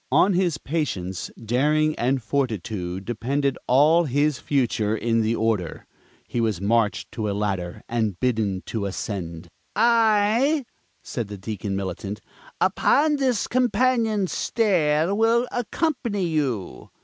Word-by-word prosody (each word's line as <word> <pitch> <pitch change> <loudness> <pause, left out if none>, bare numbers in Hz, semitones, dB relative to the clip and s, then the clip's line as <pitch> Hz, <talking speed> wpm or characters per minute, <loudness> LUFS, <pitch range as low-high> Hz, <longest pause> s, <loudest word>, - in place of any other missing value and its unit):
On 195 - +4
his 175 -4 +1
patience, 115 - -3
daring 150 +7 +1
and 130 +1 0
fortitude 105 -7 -2
depended 135 +4 -1
all 155 +7 +5
his 145 +1 +1
future 115 -6 0
in 115 0 +1
the 110 +1 +1
Order. 110 -8 -1 0.4
He 120 - -2
was 110 -6 0
marched 105 +1 0
to 110 -2 -3
a - - -1
ladder 95 -4 -3
and 110 -6 -1
bidden 110 -7 0
to 105 -3 -3
ascend. 90 -4 -5 0.3
"I," 230 +5 +3 0.4
said 115 -4 -4
the 100 0 -7
Deacon 100 0 -4
Militant, 100 +2 -4 0.4
"upon 300 +1 +3
this 255 -5 +1
companion 245 -4 +2
stair 175 -5 +1
will 230 +3 +3
accompany 245 - -1
you." 140 - -2
130 Hz, 125 wpm, -24 LUFS, -, 0.4 s, all